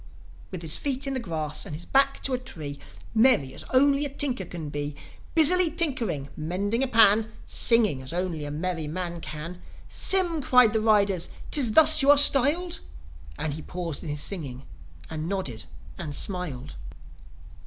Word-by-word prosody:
With 180 -3 -8
his 155 -2 0
feet 275 -1 -3
in 275 - -3
the 260 - -2
grass, 155 - -4
and 150 - -7
his 165 - -7
back 275 0 +1
to 270 - -1
a 250 - -1
tree, 155 - -8 0.3
Merry 225 - +3
as - - -5
only 275 +2 +3
a 290 - -3
tinker 275 -2 -2
can 160 -4 -7
be, 145 0 -5 0.4
Busily 340 +2 +5
tinkering, 240 - -2
mending 195 +9 -2
a 270 - +1
pan, 220 -2 +4
Singing 220 - +2
as 130 - -5
only 175 -3 -3
a 145 - -5
merry 160 +1 -4
man 170 +1 -5
can... 165 +4 -8 0.3
"Sym!" 350 -5 +1
cried 250 -4 +4
the 220 - +1
riders. 200 -5 +2
" - - -14
'Tis 250 -7 +1
thus 310 +1 +6
you 275 - +2
are 290 - +7
styled?" 290 +5 +5 0.6
And 155 - -3
he 155 - -6
paused 170 -2 -5
in 165 - -8
his 145 0 -3
singing, 140 -9 -3 0.4
and 160 +1 -5
nodded 140 - -4 0.3
and 145 -2 -6
smiled. 155 -8 -3
195 Hz, 175 wpm, -25 LUFS, -, 0.6 s, are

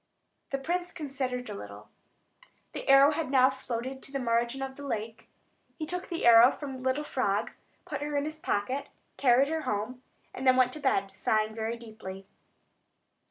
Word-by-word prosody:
The 275 - -1
prince 350 +6 -2
considered 265 -5 -4
a 210 - -5
little. 105 - -9 0.8
The - - -6
arrow 275 +1 +8
had 315 -1 -2
now 260 -1 +5
floated 260 0 -5
to - - -8
the 275 - -2
margin 240 +1 0
of 265 0 -5
the 285 - -10
lake; 225 -4 -5 0.5
he 315 - -3
took 360 +3 -4
the 335 -7 -2
arrow 235 +1 +9
from 285 -3 -6
the - - -10
little 260 +3 0
frog, 205 -9 -1 0.3
put - - -5
her 295 0 -2
in 285 - 0
his 310 0 -6
pocket, 255 +3 -2 0.3
carried 265 +1 +4
her 320 0 -1
home, 230 +2 -3 0.3
and 265 - -3
then 255 - +7
went 255 0 +3
to 305 - -7
bed, 200 -9 +1
sighing 215 +2 +1
very 225 +1 -3
deeply. 215 -4 -9
260 Hz, 180 wpm, -29 LUFS, 230-280 Hz, 0.8 s, arrow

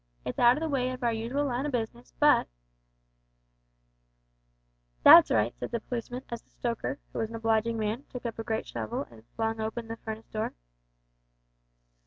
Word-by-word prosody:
It's - - -4
out 240 +1 +6
o' - - -2
the 320 - -1
way 260 -4 0
of 255 0 -6
our 235 -1 +2
usual 240 +6 -1
line 260 +1 -1
of 290 - -4
business, 225 - -4
but - - +5 1.7
" - - -43
"That's - - +10
right," 110 +2 +2
said - - -4
the 235 - -2
policeman, 245 +2 -5
as 235 -1 -5
the - - -37
stoker, 240 +3 -3 0.2
who - - -3
was 225 - -1
an 230 - -7
obliging 225 0 +1
man, 220 +5 -2
took 250 -1 -8
up 230 -1 -4
a - - -2
great 225 -1 -2
shovel 110 -2 -4
and 115 0 -16
flung 225 0 -1
open 225 +1 -4
the 225 - -5
furnace 220 0 -7
door. 215 0 -3
225 Hz, 185 wpm, -29 LUFS, -, 1.7 s, That's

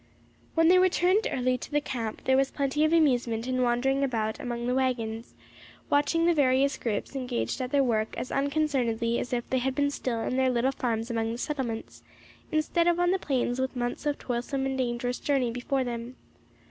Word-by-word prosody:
When 325 0 +4
they 365 +2 +6
returned 370 +3 +3
early 255 0 0
to - - -8
the 295 - +2
camp, 235 -6 -5
there 265 - +3
was 270 0 +3
plenty 280 +1 0
of 310 - +3
amusement 245 -8 +2
in 255 0 0
wandering 260 +3 +1
about 220 -5 -1
among 240 -1 -4
the 250 - 0
waggons, 235 -3 -2 0.6
watching 310 +3 +3
the 345 - +4
various 275 -2 +3
groups 225 +3 -3
engaged 250 0 -2
at 250 - -2
their 285 -1 +4
work 220 -3 0
as - - -4
unconcernedly 275 -5 0
as - - -4
if 240 -1 -2
they 260 - +2
had 260 +1 -1
been 285 0 +1
still 240 -5 -2
in 255 - -2
their 260 0 +3
little 250 +2 +1
farms 230 -3 -2
among 225 -1 -1
the 230 - -4
settlements, 250 -5 -4 0.5
instead 325 +2 +1
of 345 0 +3
on 355 0 +3
the 380 - +1
plains 255 -4 -1
with 260 0 -2
months 245 +4 -3
of 290 - 0
toilsome 255 +2 -2
and 265 0 -2
dangerous 245 0 -1
journey 265 -5 +1
before 255 +3 -1
them. 240 0 -5
255 Hz, 200 wpm, -28 LUFS, 240-285 Hz, 0.6 s, they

